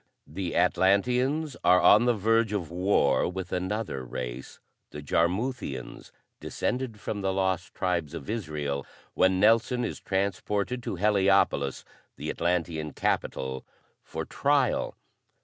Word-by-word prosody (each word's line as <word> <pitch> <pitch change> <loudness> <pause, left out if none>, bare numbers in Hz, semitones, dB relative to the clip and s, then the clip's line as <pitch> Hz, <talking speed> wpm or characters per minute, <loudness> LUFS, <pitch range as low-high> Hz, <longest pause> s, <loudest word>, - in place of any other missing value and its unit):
The 90 +2 -5
Atlanteans 125 - +2
are 90 +1 +6
on 105 +6 +6
the 120 -1 +3
verge 110 +1 +2
of 90 -6 -3
war 90 -6 +2
with 90 0 -6
another 95 - -2
race, 60 +1 -6 0.3
the 75 - -8
Jarmuthians, 85 - -2 0.3
descended 125 -4 -3
from 105 0 -4
the 95 0 0
Lost 95 -2 -1
Tribes 85 -4 -1
of 70 - -7
Israel, 75 - -3 0.3
when 95 0 +3
Nelson 115 +4 +3
is - - -5
transported 100 +4 -1
to 120 - -4
Heliopolis, 95 -8 +2 0.3
the - - -3
Atlantean 85 -4 -1
Capital, 65 0 -2 0.4
for - - -6
trial. - - +1
95 Hz, 120 wpm, -27 LUFS, 80-105 Hz, 0.4 s, are